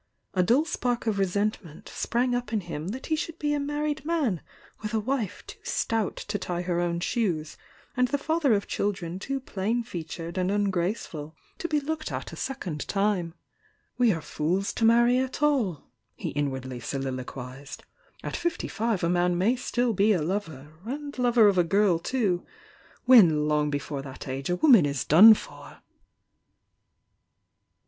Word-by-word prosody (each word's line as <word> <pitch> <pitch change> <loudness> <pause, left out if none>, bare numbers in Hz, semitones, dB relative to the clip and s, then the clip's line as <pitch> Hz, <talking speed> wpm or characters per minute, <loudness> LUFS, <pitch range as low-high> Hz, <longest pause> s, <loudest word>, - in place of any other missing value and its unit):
A 185 - +2
dull 245 - +3
spark 245 -7 -2
of 215 -3 0
resent 200 +3 0
ment 160 -3 -13
sprang 245 +1 -1
up 245 -2 -2
in 220 -2 0
him 170 -2 -6
that 250 +7 -5
he 315 - +1
should 315 +1 -4
be 295 -2 0
a 295 - 0
married 295 0 -2
man 295 - 0 0.4
with 215 +1 -3
a - - +2
wife 225 -3 -2
too - - -11
stout 225 -3 -1
to - - -4
tie 175 0 -3
her 175 -1 -1
own 170 -1 0
shoes, 175 - -1 0.4
and 250 -1 +3
the 285 - 0
father 315 -3 +1
of 200 - -1
children 185 -3 -2
too 275 +7 -3
plain 230 -1 -2
featured 170 -1 -6
and 185 0 0
ungraceful 185 -6 -2 0.2
to 340 - -2
be 305 -2 +1
looked 310 +2 -4
at - - -5
a - - -6
second 180 - -4
time. 195 -5 0 0.6
"We 240 -3 +5
are 165 -5 -3
fools 180 +7 -1
to 225 - 0
marry 240 +2 +5
at 260 +3 -3
all!" 240 - 0 0.2
he - - -4
inwardly 130 -3 -3
solilo 130 +1 -3
quized. 135 +3 -9 0.4
"At - - -4
fifty 345 -1 -2
five 225 -4 -1
a - - +3
man 175 0 +2
may 210 +8 +3
still 245 -1 0
be 205 +2 +3
a 175 - 0
lover— 155 -5 -4
and 285 +5 -5
lover 240 -3 +5
of 195 -3 +3
a - - +5
girl, 195 -1 +2
too 200 -5 0 0.3
— - - -28
when 175 -12 +6
long 150 0 +1
before 145 -1 -3
that 135 +1 -9
age 135 +3 -4
a 180 - +2
woman 230 - +6
is 140 -1 -2
done 215 +9 +9
for!" - - -11
200 Hz, 175 wpm, -27 LUFS, 165-245 Hz, 0.6 s, done